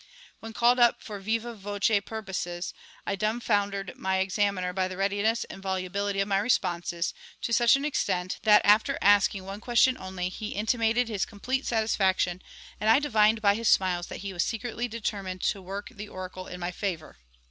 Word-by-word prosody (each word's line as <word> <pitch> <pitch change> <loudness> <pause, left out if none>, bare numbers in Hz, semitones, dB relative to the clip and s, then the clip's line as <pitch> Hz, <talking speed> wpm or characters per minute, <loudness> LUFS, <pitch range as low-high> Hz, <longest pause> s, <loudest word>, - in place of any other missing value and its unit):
When 225 - -8
called 240 +3 +3
up 240 -1 +5
for 205 -3 -7
vivâ 230 +3 -2
voce 205 +1 0
purposes, 185 -5 -5 0.3
I 200 - -1
dumb 215 +4 -1
foundered 200 -4 -1
my 190 0 -1
examiner 190 -1 0
by 185 0 0
the 185 0 -7
readiness 205 +4 +1
and 195 - -10
volubility 195 +1 -2
of 195 - +1
my 195 -1 +2
responses, 175 -5 0 0.3
to 235 - -1
such 235 0 +5
an 275 +1 -2
extent 185 -11 -1
that, 210 -1 +5
after 210 +2 +4
asking 200 -1 +4
one 195 +1 -6
question 255 +2 +3
only, 185 -1 -4
he 215 +3 -6
intimated 225 +3 +1
his 210 -4 -2
complete 255 +6 -3
satisfaction, 190 -5 +1 0.4
and 215 - +1
I 225 - +7
divined 220 -6 +3
by 200 -1 +5
his 225 +1 0
smiles 180 -2 +2
that - - -7
he 195 -1 -5
was 175 - -1
secretly 235 +3 -2
determined 200 -5 -4
to 200 - 0
work 195 +2 -6
the 210 0 -9
oracle 185 0 -7
in 180 - -8
my 175 0 -3
favour. 175 - -5
200 Hz, 180 wpm, -27 LUFS, 190-225 Hz, 0.4 s, I